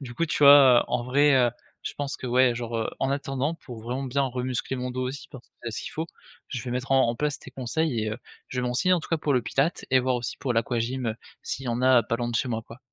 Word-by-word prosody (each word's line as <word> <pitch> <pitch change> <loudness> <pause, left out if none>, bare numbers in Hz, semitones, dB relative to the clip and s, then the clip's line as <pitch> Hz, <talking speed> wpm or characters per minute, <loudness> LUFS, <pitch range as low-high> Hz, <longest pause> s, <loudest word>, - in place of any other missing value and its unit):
du 125 -4 -8
coup, 170 - 0
tu - - -2
vois, 140 -3 +9
heu, - - -2
en 120 0 0
vrai, 140 +4 +3
heu, 125 -2 +4 0.3
je - - -4
pense 145 0 -4
que - - -7
ouais, 125 0 +4
genre, 120 -1 -4
heu, 110 - -1
en 135 - 0
attendant, 140 +2 -1
pour 125 -8 -10
vraiment 125 +4 -3
bien 140 +2 0
re-muscler 125 +1 -3
mon 125 0 -3
dos 130 +1 -3
aussi 140 +2 -8
parce 130 -4 -12
que - - -61
c'est 115 - -3
ce - - -4
qu'il - - -7
faut, 160 +1 -3 0.4
je 125 -5 -4
vais 125 - -5
mettre 125 +2 -2
en 135 -3 +4
en 115 - 0
place 150 +1 -1
tes - - -12
conseils 130 0 -1
et 110 0 -2
heu, 110 - -5 0.3
je 130 - -5
vais 125 - 0
me 125 - -1
renseigner 125 +10 +2
en 175 - 0
tout - - -10
cas 165 - +1
pour 150 -1 0
le 125 - +2
Pilates 135 +8 0
et 130 - +5
voir 130 0 0
aussi 120 -1 -4
pour 130 - -1
l'aquagym, 120 +2 -1
heu, 110 - -2 0.3
s'il 135 - -4
y - - -2
en 120 +1 -1
a, 130 -1 +6
heu, - - -4
pas 115 - +1
loin 120 0 -2
de 115 - 0
chez 130 - 0
moi, 115 -1 -2
quoi. 115 - -12
125 Hz, 305 wpm, -26 LUFS, 120-140 Hz, 0.4 s, vois